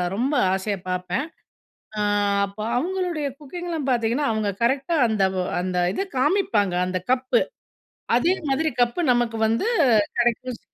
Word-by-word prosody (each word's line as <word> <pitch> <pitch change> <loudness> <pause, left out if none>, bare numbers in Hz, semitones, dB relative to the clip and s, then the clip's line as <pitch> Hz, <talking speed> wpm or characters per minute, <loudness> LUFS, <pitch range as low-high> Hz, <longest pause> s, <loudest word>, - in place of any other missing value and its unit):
ரொம்ப 260 +7 0 0.2
ஆசையா 195 +1 -1
பார்ப்பேன். 180 - -2 0.7
அ - - 0 0.4
அப்போ 200 +2 -7
அவங்களுடைய 350 -2 -1
குக்கிங்லாம் 325 -1 -5
பார்த்தீங்கன்னா 240 +4 +1
அவங்க 215 -2 -1
கரெக்ட்டா 275 +7 +1
அந்த 215 -3 -1 0.4
அந்த 180 0 -2 0.2
இத 390 - -2
காமிப்பாங்க. 235 - +2
அந்த 185 0 -2
கப்பு 255 0 +2 0.8
அதே 340 +9 +3 0.2
மாதிரி 315 +4 +1
கப்பு 240 +9 0
நமக்கு 235 -2 0
வந்து 230 - 0 0.5
கிடைக்கும். 240 0 0
245 Hz, 125 wpm, -23 LUFS, 215-305 Hz, 0.8 s, அதே